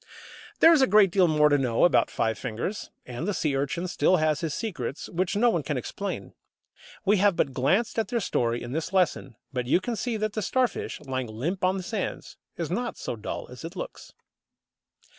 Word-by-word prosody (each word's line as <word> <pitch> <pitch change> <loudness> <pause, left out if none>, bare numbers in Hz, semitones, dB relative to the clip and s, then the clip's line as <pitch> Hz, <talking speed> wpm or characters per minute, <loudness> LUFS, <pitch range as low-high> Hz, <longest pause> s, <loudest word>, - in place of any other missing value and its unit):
There 330 - +9
is 305 - +4
a 265 - +5
great 200 -2 +5
deal 185 -1 +4
more 150 -2 +4
to 145 -1 +3
know 125 0 +3
about 175 - +3
Five 110 0 -1
fingers; 125 - -4 0.2
and 125 +8 -5
the 205 - 0
Sea 150 -4 0
urchin 145 +6 -1
still 185 +1 +3
has 155 -2 +1
his 165 -3 -2
secrets 140 - -4
which 175 +2 -1
no 235 +3 +4
one - - 0
can - - -2
explain. - - -5 0.7
We 205 +2 +4
have 200 -1 +4
but 135 - 0
glanced 185 - +1
at 220 - 0
their 235 +3 0
story 120 - -1
in 120 - -6
this 160 +5 -3
lesson; 175 - +1 0.2
but 125 -2 -2
you 155 - +4
can 235 +5 -3
see 230 0 -2
that 215 0 -2
the 215 - -2
Starfish, 250 +3 -1
lying 130 -3 -3
limp 145 - -3
on 185 +1 +2
the 185 - -4
sands, 220 +4 -4 0.2
is - - -3
not - - -2
so - - -4
dull - - -6
as - - -10
it - - -7
looks. - - -7
175 Hz, 210 wpm, -27 LUFS, 135-210 Hz, 0.7 s, There